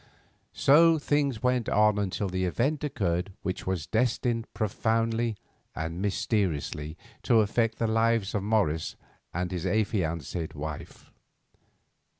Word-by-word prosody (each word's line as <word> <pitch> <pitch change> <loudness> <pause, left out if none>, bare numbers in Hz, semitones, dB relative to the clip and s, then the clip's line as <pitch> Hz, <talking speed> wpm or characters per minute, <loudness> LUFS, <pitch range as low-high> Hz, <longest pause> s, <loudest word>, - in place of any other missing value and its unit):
So 165 +4 +6
things 145 -5 0
went 125 -2 +1
on 105 0 +3
until 100 0 -1
the 95 0 -1
event 135 - 0
occurred 95 - -1
which 95 0 -4
was 90 -5 -1
destined 115 0 0
profoundly 115 +1 0 0.4
and 80 +3 -4
mysteriously 85 -7 -1 0.2
to 115 -2 +4
affect 115 +2 0
the 115 - 0
lives 115 -2 +1
of 105 - 0
Morris 95 -7 0 0.4
and 90 +1 -2
his 90 0 -2
affianced 90 - -1
wife. 75 0 -7
105 Hz, 120 wpm, -28 LUFS, 90-115 Hz, 0.4 s, So